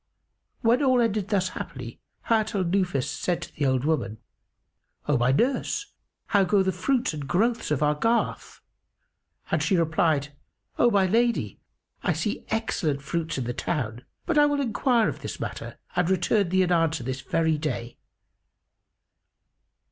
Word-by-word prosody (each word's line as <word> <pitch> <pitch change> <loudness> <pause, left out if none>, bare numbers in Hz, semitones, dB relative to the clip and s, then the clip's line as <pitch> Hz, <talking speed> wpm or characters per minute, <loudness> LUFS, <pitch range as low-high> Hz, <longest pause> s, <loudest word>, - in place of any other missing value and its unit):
When 235 +3 +3
all 260 -3 +4
ended 215 -4 +1
thus 190 -3 +1
happily, 130 -10 -7 0.2
Hayat 220 -1 +1
al 190 - +1
Nufus 175 -7 0
said 175 -2 -1
to - - -10
the 145 -3 0
old 130 0 +1
woman, 150 -9 0 0.9
"O 150 - +3
my 125 +1 +3
nurse, 270 - 0 0.3
how 200 -2 +3
go 195 +1 +3
the 190 - +1
fruits 240 +4 0
and 145 -2 -6
growths 230 +9 +1
of 150 -1 +1
our 150 0 +3
garth?"; 230 +10 -1 0.9
and - - +2
she 190 - +2
replied, 160 -3 +1 0.5
"O 240 - +6
my 200 -4 +3
lady, 235 +5 +1 0.4
I - - +1
see - - -3
excellent 160 -10 -1
fruits 165 +1 -2
in 130 - -1
the 120 +1 -3
town; 120 -6 -3 0.2
but 335 -4 +2
I 295 - +6
will 290 -1 0
enquire 240 -2 +2
of - - -3
this - - -6
matter - - -6 0.2
and 180 -1 +2
return 190 +1 +2
thee 185 +1 +3
an 180 - -1
answer 165 -5 +2
this 130 +2 -4
very 160 0 +1
day." 125 -6 -4
180 Hz, 160 wpm, -26 LUFS, 150-225 Hz, 0.9 s, O